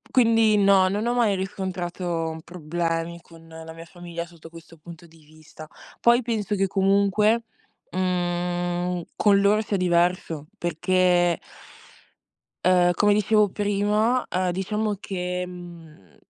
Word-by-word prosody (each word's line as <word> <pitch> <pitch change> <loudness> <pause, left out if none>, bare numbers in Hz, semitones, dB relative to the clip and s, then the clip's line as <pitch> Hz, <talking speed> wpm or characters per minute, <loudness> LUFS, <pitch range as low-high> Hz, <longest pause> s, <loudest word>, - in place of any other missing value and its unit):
Quindi 225 -3 +4
no, 195 -2 +4
non 210 +4 -2
ho 240 - 0
mai 225 -5 +2
riscontrato 175 -4 -4
problemi 170 0 -3
con 165 -1 -17
la 160 0 -10
mia 165 0 -10
famiglia 170 0 -8
sotto 170 -2 -15
questo 165 0 -14
punto 170 +2 -13
di 160 -1 -21
vista. 155 0 -14 0.3
Poi 240 +1 +4
penso 220 -4 -2
che, 195 -1 +1
comunque, 200 +3 +2 0.5
mhmm, 175 -1 -1
con 200 -1 +3
loro 205 +2 +3
sia 210 -1 -3
diverso, 175 -4 0
perché 175 +1 +2 1.3
ehm, 180 -1 +4
come 205 +3 +3
dicevo 210 0 +3
prima, 210 +5 0
ehm, 185 0 0
diciamo 210 +3 -2
che, 180 -2 -4
mhmm, 170 - -13
180 Hz, 125 wpm, -24 LUFS, 170-205 Hz, 1.3 s, Quindi